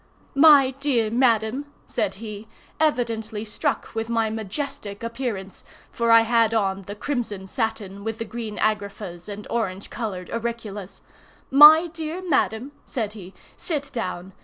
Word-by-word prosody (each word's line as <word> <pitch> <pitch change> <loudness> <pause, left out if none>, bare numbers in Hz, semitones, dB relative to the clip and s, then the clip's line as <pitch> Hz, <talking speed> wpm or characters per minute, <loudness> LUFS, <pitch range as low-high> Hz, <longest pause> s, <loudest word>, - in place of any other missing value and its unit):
"My 280 -2 +7
dear 245 -7 +1
madam," 235 +2 +2 0.2
said 200 -2 -2
he, 215 0 -8 0.3
evidently 230 -7 0
struck 210 - -2
with 225 0 -3
my 225 -2 +1
majestic 220 0 -5
appearance, 230 -5 -4 0.3
for 235 0 0
I 230 0 +8
had 230 -1 +3
on 195 -3 0
the 205 - -6
crimson 215 -6 -3
satin, 205 -3 -3
with 225 0 -3
the 230 - -4
green 225 -2 -6
agraffas, 200 -4 -2
and 205 0 -7
orange 200 -4 -2
colored 200 -6 -5
auriclas. 225 -4 -5 0.5
"My 300 +4 +10
dear 330 +2 -6
madam," 260 -4 +1
said 215 -4 -3
he, 190 -3 -11 0.2
"sit 285 -5 -3
down. 185 -5 -4
225 Hz, 135 wpm, -24 LUFS, 205-250 Hz, 0.5 s, My